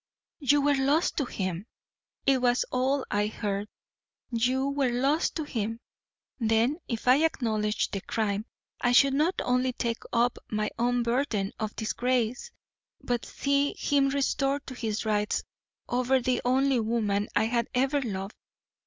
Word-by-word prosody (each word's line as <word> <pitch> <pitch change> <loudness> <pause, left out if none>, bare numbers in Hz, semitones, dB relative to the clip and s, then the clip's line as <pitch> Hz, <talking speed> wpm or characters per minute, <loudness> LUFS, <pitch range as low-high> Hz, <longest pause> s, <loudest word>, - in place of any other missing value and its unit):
"YOU 290 0 +3
were 290 +1 +3
lost 285 +5 +2
to 285 - +1
him! 185 -3 -4 0.6
It 270 -2 +3
was 245 0 +2
all 260 +2 +1
I 205 0 +1
heard. 205 -1 -3 0.6
YOU 250 +3 +1
were 280 -2 +1
lost 270 +6 +1
to 315 - -2
him! 225 -5 -3 0.6
Then, 230 +5 +2
if 230 -1 -4
I 255 +2 +7
acknowledged 215 -8 0
the 195 - -3
crime 210 +1 -2 0.3
I 245 - +2
should 275 +2 +6
not 315 +6 +1
only 250 0 +1
take 235 -1 -2
up 240 +1 +2
my 210 -1 -1
own 245 0 +2
burden 235 -5 0
of 215 -1 -3
disgrace, 245 - -1 0.5
but 240 -1 -2
see 280 0 0
him 280 -1 +2
restored 275 0 0
to 260 - -7
his 220 -3 -3
rights 210 -1 0 0.4
over 255 +2 +2
the 250 0 0
only 265 +1 +2
woman 215 -3 0
I - - +4
had 235 0 0
ever 270 +3 +2
loved. 195 -4 -4
245 Hz, 150 wpm, -28 LUFS, 220-275 Hz, 0.6 s, I